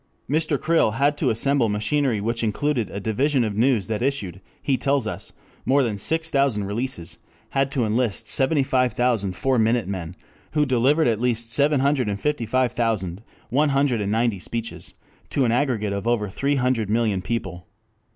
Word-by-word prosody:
_] 145 - +1
Mr. 155 -3 +1
Creel 160 -9 +2
had 145 +2 +2
to - - +2
assemble 125 +1 +2
machinery 110 +3 0
which 115 +3 -1
included 120 +2 0
a 100 - -5
Division 130 +6 +1
of 105 -3 -2
News 115 -2 +2
that 110 -1 -3
issued, 105 -9 -2 0.2
he 135 - 0
tells 140 +1 +1
us, - - -5 0.3
more 135 +3 +3
than 110 -5 -2
six 160 +8 -1
thousand 135 -7 +2
releases, 100 -3 -4 0.3
had 135 0 +1
to 130 -4 0
enlist 110 0 0
seventy 140 +2 +2
five 125 -3 +1
thousand 110 -5 0
Four 130 +4 +1
Minute 115 -2 +2
Men 90 -3 -5 0.4
who 150 -1 +3
delivered 135 +4 +3
at 115 -2 0
least 120 -2 0
seven 145 +1 +2
hundred 135 -5 +1
and 100 0 -3
fifty 150 -5 -1
five 130 +2 +1
thousand, 105 -6 -1 0.3
one 145 +4 +3
hundred 135 -5 +1
and 100 0 -2
ninety 115 -2 +1
speeches 115 +4 -6 0.3
to 135 - +1
an 115 - +2
aggregate 120 -5 0
of 100 +3 -4
over 110 -4 +1
three 140 +8 0
hundred 125 -5 0
million 110 -4 +1
people. 95 -6 -4
120 Hz, 185 wpm, -23 LUFS, 105-140 Hz, 0.4 s, more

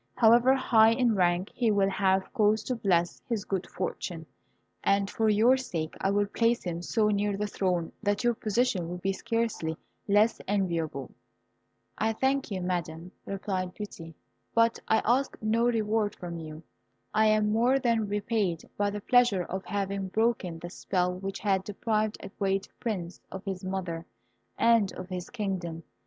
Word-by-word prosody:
However 240 +3 +6
high 225 -4 +5
in 240 -1 +2
rank, 180 0 +1
he 240 -2 +1
will 200 -2 +2
have 190 -1 +1
cause 215 -2 +3
to 255 - -2
bless 180 -6 +1
his 220 -4 -1
good 190 -3 -2
fortune, 175 -2 -4 0.6
and 200 0 +2
for 220 +2 +1
your 225 +5 +5
sake 165 -11 -4
I 195 - +2
will 205 +1 +2
place 230 +3 +1
him 170 -2 -3
so 210 +4 +1
near 205 -1 0
the 210 - -1
throne 180 -4 -1
that 205 +1 0
your 240 0 +3
position 215 -5 0
will 180 - -4
be 195 +2 -1
scarcely 225 -7 -2 0.3
less 210 +3 +3
enviable." 165 -9 -1 0.9
"I 220 +1 +1
thank 265 +3 0
you, 190 -3 -3
Madam," 175 -1 -3 0.2
replied 190 -2 -3
Beauty; 165 -6 -8 0.4
"but 230 0 +3
I 220 - +3
ask 260 +4 +1
no 225 +2 +1
reward 220 -3 +1
from 170 -2 -6
you. 155 0 -8 0.5
I 220 0 +4
am 215 -1 +3
more 240 +5 +3
than 230 -4 +1
repaid 205 -4 -1
by 205 0 +1
the 205 0 -5
pleasure 240 -6 +4
of 190 +2 -5
having 200 -1 -2
broken 215 -4 0
the 175 +1 -8
spell 180 -1 -1
which 195 +1 -5
had 195 -2 +1
deprived 215 +1 -1
a - - -7
great 195 -1 -1
prince 190 -7 -4
of 190 0 -7
his 190 -1 -4
mother 180 -3 -4 0.5
and 230 -4 +4
of 185 0 -8
his 180 -1 -5
kingdom. 185 -7 -4
200 Hz, 165 wpm, -28 LUFS, 180-225 Hz, 0.9 s, However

